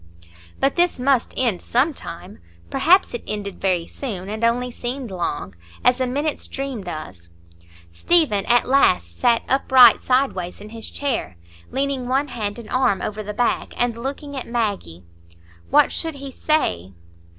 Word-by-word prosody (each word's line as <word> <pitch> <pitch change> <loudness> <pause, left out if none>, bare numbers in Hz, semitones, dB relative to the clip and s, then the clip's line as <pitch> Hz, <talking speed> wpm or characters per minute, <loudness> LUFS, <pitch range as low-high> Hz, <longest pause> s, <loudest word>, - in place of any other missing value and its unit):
But 275 +4 +1
this 350 0 +3
must 255 -1 +1
end 235 -8 +1
some 270 +7 +1
time, 180 -6 -9 0.3
perhaps 365 +4 +4
it 240 - -5
ended 205 -2 -5
very 180 -3 +1
soon, 200 -7 -6
and 220 +2 -5
only 245 +2 +1
seemed 245 -1 -5
long, 145 - -3 0.3
as 250 +1 +4
a 255 - +1
minute's 290 +4 -2
dream 270 -6 -5
does. 95 - -8 0.6
Stephen 220 - +2
at 240 0 +4
last 85 - +2
sat 235 -1 +3
upright 260 -3 +6
sideways 250 -9 0
in 210 +1 -10
his 225 0 -5
chair, 235 - -3 0.3
leaning 270 -2 -2
one 270 +3 0
hand 210 -4 -4
and 235 -2 -10
arm 255 -7 +2
over 215 +2 -4
the 210 0 -5
back 240 +3 -1
and 245 -1 +1
looking 280 +4 -5
at 265 - -5
Maggie. 205 - -3 0.7
What - - +5
should 325 -2 -2
he 275 -1 -8
say? 95 - 0
240 Hz, 155 wpm, -22 LUFS, 200-270 Hz, 0.7 s, upright